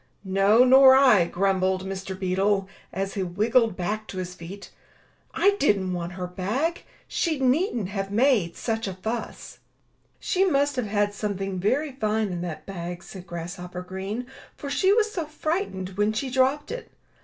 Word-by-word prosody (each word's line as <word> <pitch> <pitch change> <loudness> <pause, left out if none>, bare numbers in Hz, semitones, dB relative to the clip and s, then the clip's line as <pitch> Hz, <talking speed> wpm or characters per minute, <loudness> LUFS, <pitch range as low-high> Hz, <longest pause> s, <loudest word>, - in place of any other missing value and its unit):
"No, 195 +4 +4
nor 260 +1 +8
I, 255 -10 +6
grumbled 190 +1 0
Mr. 190 0 -5
Beetle, 195 +1 +1 0.2
as 195 +1 -3
he 200 - -2
wriggled 215 +4 +1
back 210 +4 -3
to 190 - -8
his 180 -1 -4
feet. 185 +3 -10 0.6
"I 400 - +4
didn't 195 - +1
want 175 0 -4
her 180 0 -4
bag. 215 - -2 0.2
She 325 -3 0
needn't 260 - +1
have 195 -1 -3
made 215 -5 +2
such 225 -2 -2
a 190 - -4
fuss." 220 +5 -5 0.6
"She 375 0 +1
must 285 -6 +2
have 250 -4 -1
had 205 0 0
something 195 -2 -3
very 275 +10 0
fine 215 -4 -1
in 175 -2 -4
that 155 -3 -6
bag," 175 -2 -6
said 185 -1 -11
Grasshopper 180 +1 -6
Green, 195 +6 -5 0.3
"for 280 - -6
she 380 +5 +3
was 430 0 +3
so 340 -6 -3
fright 315 +5 -2
ened 190 0 -6
when 210 +1 +2
she 260 +4 -3
dropped 265 - +1
it. - - -6
205 Hz, 165 wpm, -25 LUFS, 185-260 Hz, 0.6 s, nor